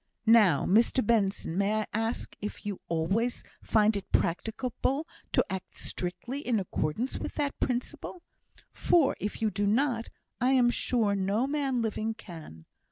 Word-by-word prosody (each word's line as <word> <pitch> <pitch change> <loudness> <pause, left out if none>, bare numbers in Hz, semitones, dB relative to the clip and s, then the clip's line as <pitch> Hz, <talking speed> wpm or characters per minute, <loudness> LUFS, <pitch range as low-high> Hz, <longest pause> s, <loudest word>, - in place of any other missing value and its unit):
Now, 215 -9 +6
Mr 230 +4 +3
Benson, 200 -6 +1
may 210 +2 +2
I - - -3
ask, 225 +2 -2
if 210 0 -6
you 205 -2 -4
always 195 +9 0 0.2
find 215 0 +3
it 200 - -5
practicable 250 - 0 0.2
to - - +3
act 190 -2 -6
strictly 235 +9 -4
in 245 -6 0
accordance 190 - -2
with - - -5
that 285 -2 -2
principle? 255 +7 -3 0.5
For 330 -6 +3
if 210 +2 -4
you 215 - +2
do 205 +2 0
not, 235 +1 +1 0.3
I 255 +2 +3
am 245 -2 +5
sure 225 -5 +1
no 200 +5 +1
man 275 -4 0
living 220 0 -2
can! 160 - -11
220 Hz, 150 wpm, -29 LUFS, 200-250 Hz, 0.5 s, Now